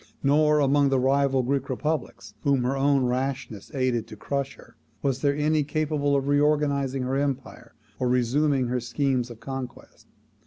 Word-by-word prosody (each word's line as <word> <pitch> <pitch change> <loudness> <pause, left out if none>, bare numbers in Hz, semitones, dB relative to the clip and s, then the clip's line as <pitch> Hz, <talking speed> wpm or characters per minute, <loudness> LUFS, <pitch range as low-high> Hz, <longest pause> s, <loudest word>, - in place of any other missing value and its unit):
Nor 150 +2 +4
among 140 0 +3
the 135 - +2
rival 135 0 +2
Greek 135 +2 -1
republics, 130 -7 -3
whom 140 -3 +2
her 130 +2 0
own 135 -1 +2
rashness 125 -4 -3
aided 130 -3 0
to - - -10
crush 140 +5 -3
her, - - -18 0.3
was 135 -2 0
there 140 -1 +2
any 150 +1 +1
capable 150 -1 0
of 140 0 0
reorganizing 145 -2 +1
her 130 +2 -1
empire, 135 -4 -4 0.2
or 125 - 0
resuming 130 +3 +2
her 125 +1 -1
schemes 125 0 -1
of 120 -2 -10
conquest. 130 +1 -8
135 Hz, 160 wpm, -25 LUFS, 125-145 Hz, 0.3 s, Nor